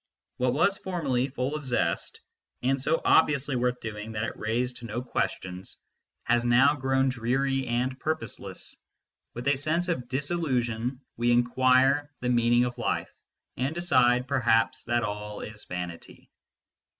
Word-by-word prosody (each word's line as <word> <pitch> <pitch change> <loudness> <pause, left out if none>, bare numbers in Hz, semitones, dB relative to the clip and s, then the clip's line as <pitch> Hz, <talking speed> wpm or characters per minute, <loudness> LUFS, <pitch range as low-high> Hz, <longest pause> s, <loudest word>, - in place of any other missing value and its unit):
What 125 -1 +1
was 200 +6 +2
formerly 140 -9 -1
full 130 +1 -3
of 150 - -5
zest, 125 -2 -1 0.4
and 135 +1 +1
so 155 +4 +1
obviously 145 -3 +3
worth 125 0 0
doing 110 0 -6
that 105 0 -2
it - - -3
raised 120 +3 -1
3* 120 - -8
MYSTICISM - - -14
AND 110 - -6
LOGIC 125 - -3
no - - -24
questions, 90 0 -3 0.5
has 120 0 +2
now 125 +4 +5
grown 135 -1 +1
dreary 135 +2 0
and 125 +2 -1
purposeless: 155 -9 -4 0.6
with 120 +3 -5
a 140 - +4
sense 165 +6 0
of 125 -8 -2
disillusion 130 -4 -1 0.2
we 120 +1 +1
inquire 130 +4 +3
the 125 - -2
meaning 120 0 +4
of 125 - -5
life, - - -2 0.4
and 135 +5 -1
decide, 125 -7 +3
perhaps, 115 -4 +2
that 120 0 +1
all 105 0 -5
is 105 -1 -8
vanity. 90 -2 -7
125 Hz, 155 wpm, -27 LUFS, 120-135 Hz, 0.6 s, now